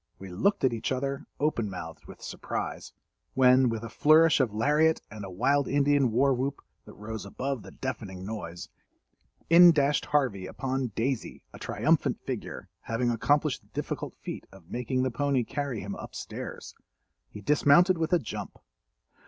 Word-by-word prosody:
We 95 - -10
looked 155 - +1
at 130 -3 +3
each 115 +2 -3
other 135 +2 -2
open 130 -8 0
mouthed 80 -4 -8
with - - -12
surprise, - - -5 0.4
when, 130 -1 +5
with 115 -1 -3
a 115 - -6
flourish 155 +7 +5
of 130 -5 +2
lariat 150 +9 +2
and 105 0 -8
a 95 - -6
wild 135 +9 +1
Indian 140 -3 +3
war 135 +4 +3
whoop, 135 +3 -2 0.3
that - - -13
rose 110 -1 -6
above 130 +5 -4
the - - -11
deafening 105 -8 -6
noise, 95 -5 -6 0.8
in 175 +1 +9
dashed 145 -2 +1
Harvey 125 -11 0
upon 135 +2 -2
"Daisy," 130 +1 -2
a - - -11
triumphant - - +1
figure—having 120 +1 -4
accomplished 145 +4 +1
the - - -28
difficult - - -4
feat - - -7
of 95 -4 -17
making 130 +1 -1
the 130 - 0
pony 140 0 +1
carry 135 -2 -3
him 100 +1 -5
up - - -9
stairs. - - -7 0.6
He 105 - -10
dismounted 150 - +4
with 160 +1 -1
a 175 - +5
jump. 145 - -7
130 Hz, 160 wpm, -28 LUFS, 110-145 Hz, 0.8 s, in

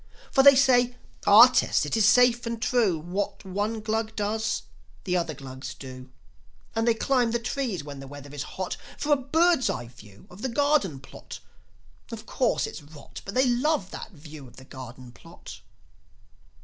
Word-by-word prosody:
For 270 - +5
they 280 0 +8
say, 250 -2 +3 0.3
"Our - - +10
test, - - +1
it - - -2
is 220 -2 +4
safe 240 +1 +4
and 230 -1 -3
true; 225 -7 +1
What 180 +6 -4
one 205 +4 -3
Glug 220 +1 -2
does, 220 +1 -2 0.4
the 180 -2 -1
other 170 -3 -1
Glugs 130 -1 -8
do; 130 -1 -10 0.7
And 225 +1 0
they 230 - +4
climb 250 0 +1
the 235 - 0
trees 235 - -3
when 145 -1 -9
the 135 - -9
weather 145 0 -11
is 145 - -5 0.2
hot, 185 -1 -3 0.2
For 295 0 +1
a - - +6
birds' 315 +2 +2
eye 120 -2 -4
view 105 -4 -16
of 180 +3 -13
the 265 - -2
garden 240 - +1
plot. 130 - -11 0.7
Of - - -8
course, - - 0
it's - - -8
rot, 145 0 -12
But 195 - -7
they 260 +1 +4
love 250 - 0
that - - -7
view 155 -6 -12
of 120 - -17
the 130 - -14
garden 130 -2 -11
plot." 115 - -13
210 Hz, 180 wpm, -26 LUFS, -, 0.7 s, Our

